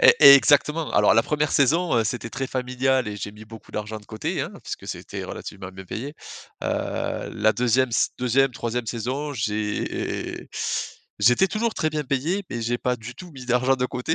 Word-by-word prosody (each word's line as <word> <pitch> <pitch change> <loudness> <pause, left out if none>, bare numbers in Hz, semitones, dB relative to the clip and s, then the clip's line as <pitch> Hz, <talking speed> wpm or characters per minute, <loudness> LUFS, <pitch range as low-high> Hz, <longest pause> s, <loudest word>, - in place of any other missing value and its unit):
E - - +9 0.2
exactement. 150 +3 +3
Alors 105 - +5
la 115 - +5
1re 150 +2 0
saison, 160 +5 +3
heu, 115 - +2
c'était 115 +2 -3
très 135 +3 -3
familial 130 0 0
et 105 - -5
j'ai 105 - -5
mis 105 +1 -13
beaucoup 110 0 -13
d'argent 105 +1 -4
de 105 - -20
côté, 110 - -3
hein, - - -3
puisque - - -6
c'était - - -6
relativement 95 -2 -7
bien 95 0 -10
payé. 130 - -6 0.5
Heu, - - -2
la 110 +1 +3
2e 125 +2 +2
ss - - +2
2e, 125 +2 +2
3e 120 0 -3
saison, 130 +6 -3
j'é 105 -2 -3 0.7
j'étais 120 - +5
toujours 215 +4 -1
très 155 - 0
bien 150 -1 -2
payé, 150 +9 0
mais 120 -1 -3
j'ai 120 +2 0
pas 125 0 0
du 120 +2 -9
tout 180 +6 -11
mis 130 -3 -9
d'argent 125 +2 +3
de 125 - 0
côté, 125 +6 -2
125 Hz, 190 wpm, -24 LUFS, 110-140 Hz, 0.7 s, E